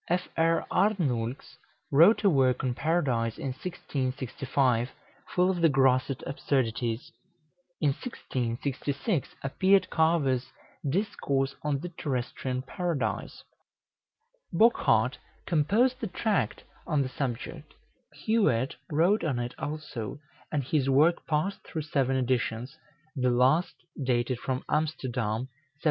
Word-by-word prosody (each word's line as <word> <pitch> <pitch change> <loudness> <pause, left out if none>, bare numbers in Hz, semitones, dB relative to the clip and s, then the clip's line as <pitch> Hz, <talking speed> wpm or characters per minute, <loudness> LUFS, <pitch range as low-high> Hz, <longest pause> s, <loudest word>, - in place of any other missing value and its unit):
Fr. 165 -2 +1
Arnoulx 135 - 0 0.3
wrote 170 +11 +6
a 200 - +6
work 130 -4 +3
on 125 -2 0
Paradise 130 -7 0
in 135 - -3
1665, 130 -5 -1 0.5
full 180 +1 +4
of 175 -2 -3
the 165 - +6
grossest 130 -1 +2
absurdities. 120 -4 -1 0.7
In 150 - +3
1666 135 - -3
appeared 190 +7 +3
Carver's 150 -6 +2 0.4
"Discourse 140 -5 0
on 145 -2 -1
the 175 - -5
Terrestrian 130 -4 -3
Paradise." 170 +2 -3 1.1
Bochart 230 +2 +3 0.3
composed 205 - +2
a 225 - -1
tract 205 +3 -1 0.2
on 150 -5 +2
the 130 - -4
subject; 130 -4 -5 0.5
Huet 140 - +2
wrote 170 +7 +3
on 145 -7 0
it 120 0 -3
also, 145 -7 -5 0.3
and 145 -3 0
his 135 0 +1
work 155 +6 +3
passed 160 +6 0
through 160 -3 -4
seven 135 -3 +1
editions, 125 0 -1 0.4
the 125 -2 +2
last 130 +8 +3 0.3
dated 125 -1 0
from 130 0 -3
Amsterdam, 125 -8 -1
1701. 130 - -6
140 Hz, 110 wpm, -28 LUFS, 125-165 Hz, 1.1 s, wrote